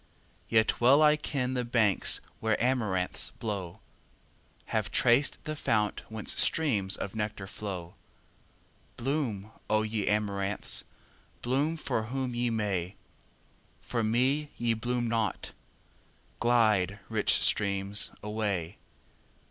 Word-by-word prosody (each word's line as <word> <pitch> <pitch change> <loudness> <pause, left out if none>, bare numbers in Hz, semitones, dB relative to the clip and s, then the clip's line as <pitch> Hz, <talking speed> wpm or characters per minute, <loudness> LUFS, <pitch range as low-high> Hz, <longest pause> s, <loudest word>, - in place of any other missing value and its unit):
Yet 110 +1 +2
well 135 +5 +6
I 150 0 +6
ken 135 -4 -2
the 125 -1 0
banks 115 -4 +3 0.2
where 110 -1 +1
amaranths 110 -8 0
blow, 100 -6 -5 0.9
Have - - 0
traced 120 +4 +3
the 155 0 -4
fount 105 -7 0
whence 110 -1 -2
streams 105 -12 +1
of 100 - -5
nectar 105 -2 -3
flow. 95 -4 -6 1.0
Bloom, 120 -6 -2 0.2
O 110 0 +3
ye 110 -1 -2
amaranths! 100 -2 0 0.6
bloom 140 +6 +1
for 110 -7 -2
whom 130 +1 -3
ye 120 0 0
may, 100 -5 -1 0.8
For 115 -2 -2
me 130 +7 +1
ye 120 -1 +1
bloom 120 +2 -1
not! 115 -1 -1 0.9
Glide, 110 -5 +3
rich 110 -2 +2
streams, 100 0 +1
away! 105 -5 -2
110 Hz, 110 wpm, -29 LUFS, 100-125 Hz, 1.0 s, well